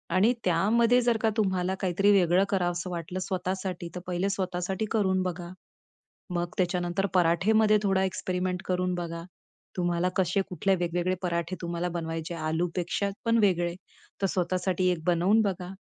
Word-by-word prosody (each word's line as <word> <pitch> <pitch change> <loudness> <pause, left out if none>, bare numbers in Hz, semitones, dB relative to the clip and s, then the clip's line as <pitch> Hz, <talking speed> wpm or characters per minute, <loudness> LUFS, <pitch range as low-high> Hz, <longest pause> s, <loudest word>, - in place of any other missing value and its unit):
आणि 215 +6 +4
त्यामध्ये 230 +8 +3
जर 235 -1 +2
का 220 - +3
तुम्हाला 190 -3 +1
काहीतरी 195 +2 +3
वेगळं 185 -1 +4
करावसं 175 -2 -1
वाटलं 175 +1 -4
स्वतःसाठी, 185 -2 -3
तर - - -3
पहिले 180 +2 0
स्वतःसाठी 190 +1 -2
करून 190 -4 +2
बघा. 175 -1 -4 0.9
मग 175 0 -1
त्याच्यानंतर 180 +1 0
पराठेमध्ये 210 +5 +4
थोडा 195 -1 +2
एक्सपेरिमेंट 180 -1 -2
करून 180 0 0
बघा. 170 -1 -4 0.5
तुम्हाला 175 0 +1
कसे 190 +1 +2
कुठले 190 +1 +1
वेगवेगळे 175 +1 0
पराठे 170 0 -2
तुम्हाला 170 +1 -2
बनवायचे, 165 0 -4
आलूपेक्षा 170 +4 -1
पण 230 0 +3
वेगळे 175 -5 +2 0.5
तर 195 - +4
स्वतःसाठी 185 0 0
एक 160 - -4
बनवून 180 +6 +3
बघा. 185 -3 -2
180 Hz, 140 wpm, -28 LUFS, 175-195 Hz, 0.9 s, आणि